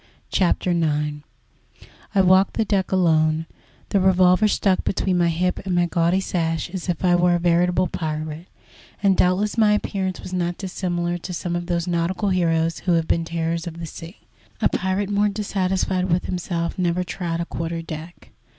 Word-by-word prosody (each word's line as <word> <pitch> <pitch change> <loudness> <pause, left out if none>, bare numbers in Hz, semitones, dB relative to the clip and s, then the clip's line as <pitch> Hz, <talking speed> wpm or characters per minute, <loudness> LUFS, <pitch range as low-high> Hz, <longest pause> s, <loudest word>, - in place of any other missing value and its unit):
CHAPTER 180 -1 +1
IX 150 -3 0 1.0
I 195 - +6
walked 185 +1 +4
the 225 - +1
deck 195 -2 0
alone, 160 -3 +2 0.4
the 200 - +2
revolver 185 +2 +4
stuck 195 -2 +1
between 190 -1 0
my 170 - +3
hip 180 +2 0
and 185 -2 -1
my 175 0 +3
gaudy 170 +2 +1
sash, 165 -3 -2
as 185 -1 -5
if 175 +1 -1
I 175 - +4
were 175 0 +4
a - - 0
veritable 175 +1 +2
pirate, 155 +1 -4 0.6
and 195 -1 +4
doubtless 195 +6 +1
my 210 -1 +5
appearance 190 -3 -2
was 185 - -8
not 175 -1 -1
dissimilar 175 -2 -2
to 180 +2 -6
some 175 0 -3
of 175 0 -3
those 170 -1 -1
nautical 175 +3 -1
heroes 165 -3 +1
who 180 - 0
have 165 -1 +1
been 165 - +1
terrors 165 +1 -2
of 165 -1 -7
the 170 - -5
sea. 165 +4 -10 0.4
A - - +3
pirate 190 +2 -1
more 205 +1 +2
dissatisfied 190 -2 -1
with 175 +1 +1
himself 170 -1 -3
never 180 0 +1
trod 170 -2 -4
a 170 - -1
quarter 165 0 -4
deck. 165 +1 -9
175 Hz, 180 wpm, -22 LUFS, 170-185 Hz, 1.0 s, I